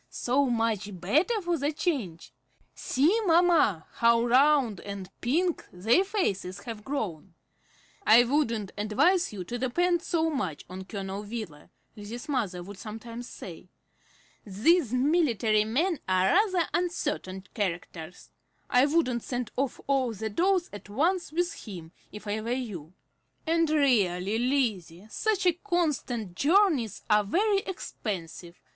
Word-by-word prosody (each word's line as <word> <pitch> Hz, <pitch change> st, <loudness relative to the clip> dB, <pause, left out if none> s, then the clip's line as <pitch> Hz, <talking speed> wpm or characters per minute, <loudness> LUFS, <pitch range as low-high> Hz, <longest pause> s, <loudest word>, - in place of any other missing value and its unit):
So 270 Hz, +3 st, +1 dB
much 220 Hz, -5 st, -1 dB
better 310 Hz, -, +2 dB
for 345 Hz, -2 st, 0 dB
the 285 Hz, +2 st, 0 dB
change! 195 Hz, -, -3 dB, 0.4 s
See, 300 Hz, -, +1 dB
mamma, 330 Hz, -, +4 dB
how 235 Hz, 0 st, +4 dB
round 255 Hz, -4 st, +4 dB
and 200 Hz, -2 st, -7 dB
pink 330 Hz, +8 st, 0 dB
their 220 Hz, -, +3 dB
faces 200 Hz, -, -2 dB
have 225 Hz, -2 st, -7 dB
grown!" 195 Hz, -, -4 dB, 0.7 s
"I 235 Hz, -, +7 dB
wouldn't 235 Hz, -7 st, 0 dB
advise 340 Hz, -, +2 dB
you 200 Hz, -4 st, -6 dB
to 240 Hz, +7 st, -5 dB
depend 345 Hz, +8 st, +1 dB
so 325 Hz, -2 st, 0 dB
much 185 Hz, -, -3 dB
on 185 Hz, +1 st, -8 dB
Colonel 195 Hz, 0 st, -5 dB
Wheeler," 210 Hz, -8 st, -7 dB, 0.3 s
Lizzie's 220 Hz, +3 st, -8 dB
mother 210 Hz, -11 st, -2 dB
would 200 Hz, +1 st, -10 dB
sometimes 230 Hz, +3 st, -8 dB
say. 180 Hz, 0 st, -10 dB, 0.7 s
"These 235 Hz, -, +2 dB
military 250 Hz, -, +2 dB
men 305 Hz, -, 0 dB
are 185 Hz, 0 st, +3 dB
rather 370 Hz, -3 st, +3 dB
uncertain 295 Hz, -, -2 dB
characters. 175 Hz, -3 st, -5 dB, 0.4 s
I 250 Hz, +2 st, +5 dB
wouldn't 280 Hz, -6 st, +1 dB
send 245 Hz, -1 st, -4 dB
off 270 Hz, 0 st, -2 dB
all 265 Hz, -4 st, +1 dB
the 220 Hz, +1 st, -4 dB
dolls 360 Hz, -, +2 dB
at 205 Hz, 0 st, -10 dB
once 340 Hz, -, 0 dB
with 345 Hz, +1 st, 0 dB
him, 170 Hz, -5 st, -8 dB, 0.2 s
if 210 Hz, 0 st, -10 dB
I 210 Hz, +1 st, -2 dB
were 225 Hz, -, -5 dB
you. 195 Hz, -, -5 dB, 0.5 s
And 330 Hz, -1 st, +2 dB
really, 220 Hz, -, +2 dB
Lizzie, 220 Hz, -9 st, -1 dB
such 420 Hz, -4 st, 0 dB, 0.2 s
constant 290 Hz, -, -1 dB
journeys 295 Hz, -, +2 dB
are 210 Hz, -1 st, +4 dB
very 395 Hz, -, +2 dB
expensive. 180 Hz, -, -6 dB
235 Hz, 130 wpm, -28 LUFS, 200-320 Hz, 0.7 s, I